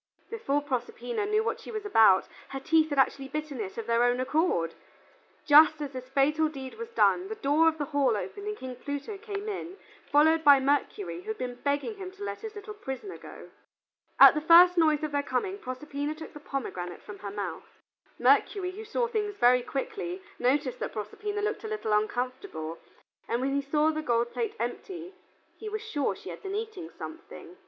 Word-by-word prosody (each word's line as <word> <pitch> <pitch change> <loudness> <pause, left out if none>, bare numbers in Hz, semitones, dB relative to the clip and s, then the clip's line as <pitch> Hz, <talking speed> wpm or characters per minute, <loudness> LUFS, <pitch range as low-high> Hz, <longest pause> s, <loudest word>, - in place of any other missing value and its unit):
Before 290 -11 -1
Proserpina 420 - -3
knew 425 +1 +2
what - - -2
she - - -11
was 430 -2 -5
about, 220 - +5 0.2
her 270 - -5
teeth 315 +3 +3
had 285 - -2
actually 270 0 +2
bitten 300 -2 -5
it 195 -2 -6
of 230 - -4
their 235 +1 +2
own 245 +1 +2
accord. 255 - +1 0.7
Just 305 +1 +7
as 290 -2 -4
this 255 -1 -8
fatal 300 +3 +2
deed 265 -3 -8
was 460 0 -5
done, 385 -5 +3
the 440 - -5
door 310 -2 +3
of 320 -1 +2
the 295 - -2
hall 275 -6 +1
opened 405 - -6
and 425 0 -3
King 255 -1 -7
Pluto 285 - -5
came 410 -1 -5
in, 385 -2 -5 0.3
followed 315 +3 +5
by 285 -2 +8
Mercury, 290 +8 -1
who 395 - -18
had 440 0 -3
been 250 -1 -4
begging 285 +9 -1
him 380 -2 -6
to 400 +1 -9
let - - -5
his 440 -1 -7
little 415 +1 -7
prisoner 390 0 -7
go. - - -12 0.7
At - - +11
the 300 - -1
first 345 +3 +8
noise 310 -3 +3
of 305 - -2
their 285 0 +1
coming, 375 +10 -2
Proserpina 285 +2 -4
took 315 0 -10
the 295 - -9
pomegranate 185 -12 -5
from 205 -1 -10
her 205 - -6
mouth. 200 0 -6 0.4
Mercury, 370 -3 +3
who 420 +4 -8
saw 460 +2 -1
things 420 -3 -2
very 250 -5 +5
quickly, 360 - -4 0.2
noticed 260 0 +1
that - - -4
Proserpina 410 - -4
looked 425 +2 -2
a - - -4
little 430 - -2
uncomfortable, 215 - -2 0.5
and 235 - 0
when 270 +2 -1
he 280 - +1
saw 300 +3 +2
the 310 0 -3
gold 235 -4 0
plate 450 -2 -2
empty, 360 -1 -5 0.5
he 435 - -5
was 430 0 -4
sure 310 -11 -1
she - - -10
had - - -9
been 390 -1 -4
eating 425 -6 -5
something. 335 +2 -10
305 Hz, 200 wpm, -28 LUFS, 265-405 Hz, 0.7 s, At